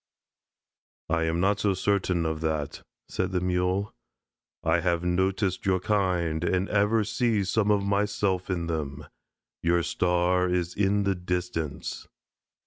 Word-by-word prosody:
"I 85 -1 +2
am 80 +1 0
not 100 +3 +2
so 100 -2 +1
certain 95 -3 +1
of 80 0 -2
that," 80 -3 -2 0.3
said 95 0 -2
the 90 - +2
Mule. 90 +3 0 0.7
"I 80 +1 +3
have 85 -1 0
noticed 95 +2 0
your 95 -1 +3
kind 90 -5 0
and 95 +2 +1
ever 105 +2 +3
see 115 -1 +1
some 105 +2 +1
of 100 -1 +3
myself 100 -2 0
in 85 -3 -1
them. 75 -3 -4 0.6
Your 85 +1 +2
star 90 +1 +1
is 90 -1 0
in 100 0 +2
the 100 0 +2
distance." 90 -4 -4
90 Hz, 135 wpm, -27 LUFS, 85-100 Hz, 0.7 s, I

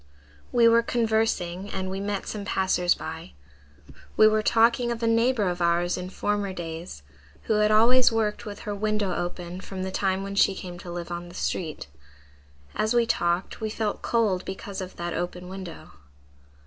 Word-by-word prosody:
"We 235 -1 +5
were 230 0 +6
conversing 220 -6 0
and 190 -1 -3
we 190 +1 -3
met 200 0 -2
some 210 -2 -4
passers 190 -3 +2
by. 65 - -7 0.8
We 215 - +8
were 215 0 +3
talking 235 +2 +3
of 235 0 -4
a - - +3
neighbor 230 -1 +3
of 180 0 -2
ours 170 +1 +2
in 180 0 -5
former 205 0 -1
days, 165 - -7 0.4
who 215 -1 +1
had 210 0 +4
always 235 +4 +6
worked 220 -2 0
with 205 -1 -7
her 210 - -4
window 210 -2 0
open 175 +1 -4
from 190 -1 -6
the 190 - -3
time 190 0 0
when 200 0 -5
she 200 -1 +4
came 175 -2 -7
to 175 - -8
live 175 0 -5
on 175 0 -5
the 175 - -13
street. 160 -4 -3 0.9
As 220 +3 0
we 235 -1 +4
talked 175 -3 0
we 220 - -1
felt 215 -1 -2
cold 210 -6 +1
because 190 +1 -6
of 185 0 -7
that 175 0 -4
open 180 0 -4
window. 185 -3 -8
195 Hz, 180 wpm, -26 LUFS, 180-220 Hz, 0.9 s, We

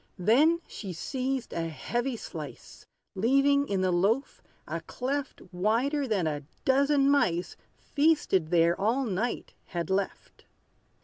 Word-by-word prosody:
Then 280 - +4
she 195 -4 -7
seized 260 - -3
a 165 -1 -2
heavy 240 - -2
slice, - - -9 0.3
Leaving 275 +7 +3
in 195 -2 0
the 185 -1 +2
loaf 205 +10 +1 0.3
a - - -4
cleft 275 +2 -4
Wider 240 +10 +1
than 200 -7 0
a 150 -2 -2 0.2
dozen 275 +1 +3
mice, 180 -12 +2 0.2
Feasted 290 - +1
there 170 0 +4
all 240 +6 +1
night, 220 +3 -2
had 170 +1 -4
left. 195 0 -3
235 Hz, 125 wpm, -28 LUFS, 185-275 Hz, 0.3 s, Then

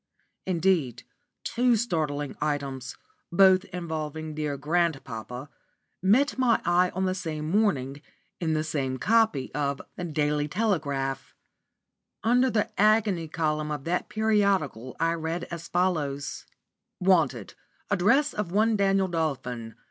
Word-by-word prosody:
Indeed 165 -9 +1 0.4
two 240 +1 +2
startling 155 - -1
items, 140 -4 -3 0.3
both 185 +1 +5
involving 160 -2 -5
dear 150 -2 -2
grandpapa, 135 -6 -2 0.5
met 255 +10 +3
my 245 -3 +4
eye 180 +1 +3
on 190 +1 0
the 185 - +1
same 160 -5 -4
morning, 145 -10 +1 0.4
in 160 -2 0
the 155 0 0
same 135 -4 -2
copy 220 - +2
of 140 -1 -1 0.2
the 180 - -4
Daily 150 -2 0
Telegraph. 145 - -1 0.9
Under 250 +3 +4
the 215 -3 0
"agony 210 -6 +3
column" 155 -1 -1
of 150 -2 -4
that 175 +3 -1
periodical 200 - +1
I 165 +1 +2
read 165 +1 -3
as 170 0 -6
follows: 150 -6 -1 0.5
"Wanted, 155 - +2 0.4
address 235 +10 +3
of 205 -5 -3
one 220 +3 +3
Daniel 195 -1 +2
Dolphin. 130 - -3
165 Hz, 120 wpm, -27 LUFS, 145-195 Hz, 0.9 s, both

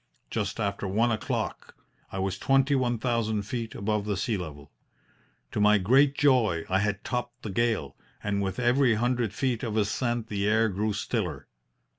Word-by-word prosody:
Just - - -2
after 100 - -2
one 115 +5 +2
o'clock 110 - -3 0.4
I - - -5
was 95 -1 -2
twenty 135 +1 +3
one 125 -3 +1
thousand 110 -3 0
feet 115 +2 -4
above 105 0 -1
the 105 -2 -1
sea 110 +4 0
level. 75 -6 -7 0.8
To - - -2
my 105 +1 +6
great 135 +8 +4
joy 115 - +3
I 95 +1 +3
had 105 -1 -1
topped 125 0 -4
the 110 - -4
gale, 110 -10 0 0.3
and 100 -1 0
with 95 -1 -2
every 125 0 +3
hundred 120 -1 0
feet 120 +1 -1
of 110 -4 -2
ascent 120 +2 0
the 100 -2 -2
air 110 +1 +3
grew 105 +2 -1
stiller. 100 - -2
110 Hz, 170 wpm, -27 LUFS, 100-120 Hz, 0.8 s, my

